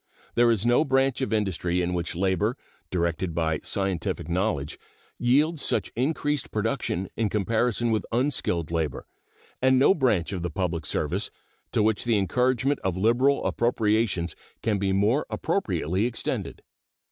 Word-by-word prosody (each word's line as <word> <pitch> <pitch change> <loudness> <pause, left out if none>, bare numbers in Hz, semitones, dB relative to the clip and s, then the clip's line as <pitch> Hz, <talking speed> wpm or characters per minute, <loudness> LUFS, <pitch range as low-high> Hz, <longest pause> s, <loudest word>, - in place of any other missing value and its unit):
There 120 0 +4
is 115 -2 +1
no 120 +5 +4
branch 135 -2 +1
of 130 - -1
industry 90 -4 0
in 90 0 0
which 85 0 -2
labor, 95 +6 +1 0.3
directed 85 -1 -1
by 80 -2 0
scientific 95 -3 -2
knowledge, 85 -5 -1 0.4
yields 145 +6 +2
such - - 0
increased 145 +2 -1
production 110 -4 -1
in 110 -2 0
comparison 115 +2 +1
with 110 - +1
unskilled 115 - 0
labor, 80 -5 -2 0.6
and 130 0 +4
no 135 +8 +6
branch 110 - +1
of 90 - -3
the 90 - -2
public 85 -2 -2
service - - -1 0.4
to - - +2
which 110 -1 +1
the 115 -3 +2
encouragement 125 +6 +1
of 95 -2 -2
liberal 120 +7 +3
appropriations 110 -7 +1 0.3
can 105 -3 +1
be 100 0 0
more 105 +9 +2
appropriately 95 - 0
extended. 120 - -4
105 Hz, 145 wpm, -26 LUFS, 90-125 Hz, 0.6 s, no